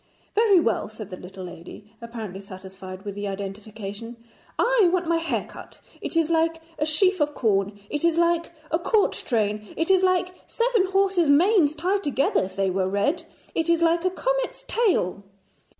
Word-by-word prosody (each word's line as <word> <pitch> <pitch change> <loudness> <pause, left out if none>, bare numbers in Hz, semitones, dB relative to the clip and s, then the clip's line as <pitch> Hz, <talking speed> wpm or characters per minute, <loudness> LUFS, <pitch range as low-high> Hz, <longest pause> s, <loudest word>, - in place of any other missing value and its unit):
'Very 415 -4 +5
well,' 230 -9 0
said 215 -2 -9
the - - -4
little 185 +1 -10
lady, 180 +4 -11
apparently 225 -5 -7
satisfied 190 -1 -10
with 205 -1 -5
the 205 +1 -4
identification, 205 +3 -6 0.4
'I 465 -6 +4
want 365 -1 +1
my 335 0 +2
hair 330 0 -2
cut. - - -12 0.2
It - - -2
is 330 0 +2
like 325 0 +2 0.2
a 300 - +1
sheaf 370 +3 +3
of 295 0 0
corn. 205 -2 0
It 295 +6 -3
is 335 -1 +3
like 340 0 +2 0.2
a 325 - +2
court 420 +4 +2
train. 210 -3 -1
It 330 +4 +2
is 380 -1 +5
like 370 -1 +2
seven 465 -5 +1
horses' 385 -4 +2
manes 320 0 +4
tied 380 +5 0
together, 280 -1 +1
if 190 - -7
they 195 -1 +1
were 185 0 0
red. 285 - 0 0.3
It 325 0 0
is 335 0 +3
like 335 0 +3
a 370 - +3
comet's - - -2
tail.' 360 - +1
300 Hz, 180 wpm, -24 LUFS, -, 0.4 s, Very